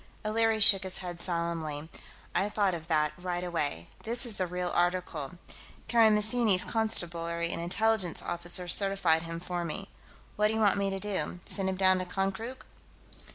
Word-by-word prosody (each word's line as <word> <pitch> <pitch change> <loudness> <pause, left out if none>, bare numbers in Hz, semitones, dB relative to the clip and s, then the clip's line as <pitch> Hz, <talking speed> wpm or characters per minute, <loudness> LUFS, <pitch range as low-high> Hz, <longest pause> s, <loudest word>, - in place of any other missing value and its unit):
O'Leary 225 +1 +1
shook 200 -2 +6
his 190 -1 -4
head 175 -2 -7
solemnly. 165 -4 -3 0.5
"I 200 - 0
thought 205 -3 0
of 165 -1 -7
that, 150 -2 +1
right 180 0 -4
away. 150 - -3
This 235 +3 +5
is 225 -4 -1
the 185 - -1
real 180 0 -4
article; 175 -5 -1 0.5
Karamessinis' 220 -3 +3
Constabulary 170 -6 0
and 170 - -4
Intelligence 195 +1 0
officers 175 +1 +1
certified 195 -5 +3
him 165 0 -6
for 175 0 -4
me. 195 +4 -5 0.5
What 210 0 +3
do 220 - -2
you - - -1
want 205 -2 +3
me 200 0 0
to 195 0 -4
do, 195 -3 -4
send 190 -1 +3
him 190 - -2
down 185 -1 +3
to 185 - -4
Konkrook?" 195 +7 -4
185 Hz, 165 wpm, -29 LUFS, 170-210 Hz, 0.5 s, shook